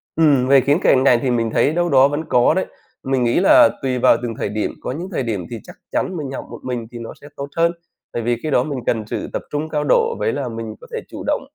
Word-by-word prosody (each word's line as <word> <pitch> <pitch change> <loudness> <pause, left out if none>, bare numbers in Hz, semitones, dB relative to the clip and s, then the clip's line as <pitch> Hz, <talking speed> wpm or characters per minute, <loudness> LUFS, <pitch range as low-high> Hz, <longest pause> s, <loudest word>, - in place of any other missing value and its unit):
Ừm, 145 -6 +3
về 135 -1 +6
khía 140 +3 +2
cạnh 130 - +4
này 125 -3 +5
thì 130 - 0
mình 115 -2 0
thấy 150 - +2
đâu 175 0 0
đó 135 -2 +6
vẫn 145 +3 -3
có 120 -1 +4
đấy. - - 0 0.4
Mình 130 -2 0
nghĩ 120 +5 +2
là 285 - +7
tùy 130 -2 -1
vào - - +5
từng 115 - -3
thời - - -2
điểm, 105 0 -2
có - - -4
những 170 +8 -5
thời 135 - -1
điểm 105 -7 -3
thì 115 - -5
chắc - - -13 0.2
chắn 185 - -1
mình 145 -4 -5
học 135 - -6
một - - -8
mình 125 -3 -4
thì 120 - -8
nó 115 - -7
sẽ 145 - -12
tốt 140 0 -5
hơn, 170 0 +3 0.4
tại 120 - -2
vì 120 +1 +1
khi 155 - -2
đó 125 - +3
mình 140 -2 -4
cần 115 -2 0
sự - - -4
tập - - -2
trung 150 +2 -3
cao 150 -2 -1
độ, 150 - +2
với 110 +2 0
là 135 -3 -3
mình 115 -1 -6
có - - -12
thể - - -2
chủ - - -8
động - - +1
130 Hz, 285 wpm, -20 LUFS, 120-150 Hz, 0.4 s, là